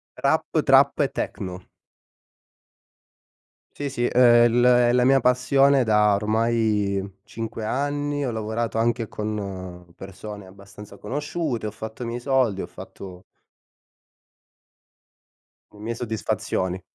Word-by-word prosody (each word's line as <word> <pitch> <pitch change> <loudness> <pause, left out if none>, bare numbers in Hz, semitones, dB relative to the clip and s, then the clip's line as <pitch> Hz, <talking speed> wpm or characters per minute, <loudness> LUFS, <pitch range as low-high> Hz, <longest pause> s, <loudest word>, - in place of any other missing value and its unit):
Rap, - - +1 0.2
trap - - +4
e - - +3
techno. 90 -1 -5 2.1
Sì, 145 -1 -4
sì, 120 -3 -2
è 120 -1 +5
l 120 - +1 0.3
la 125 0 +3
mia 135 0 +4
passione 135 +1 +3
da 105 -1 +4
ormai 105 -2 0
5 115 0 -6
anni, 145 +4 -2
ho 125 - -2
lavorato 110 +1 -3
anche 115 0 0
con 95 -5 -6
persone 100 +2 -9
abbastanza 100 +1 -13
conosciute, 140 -1 -3
ho - - -5
fatto 110 +3 -8
i - - -4
miei 120 +1 -4
soldi, 125 -6 +1
ho - - -5
fatto 90 -2 -11 2.5
le 105 - -17
mie 115 +2 -4
soddisfazioni. 95 -5 -3
110 Hz, 115 wpm, -23 LUFS, 100-125 Hz, 2.5 s, è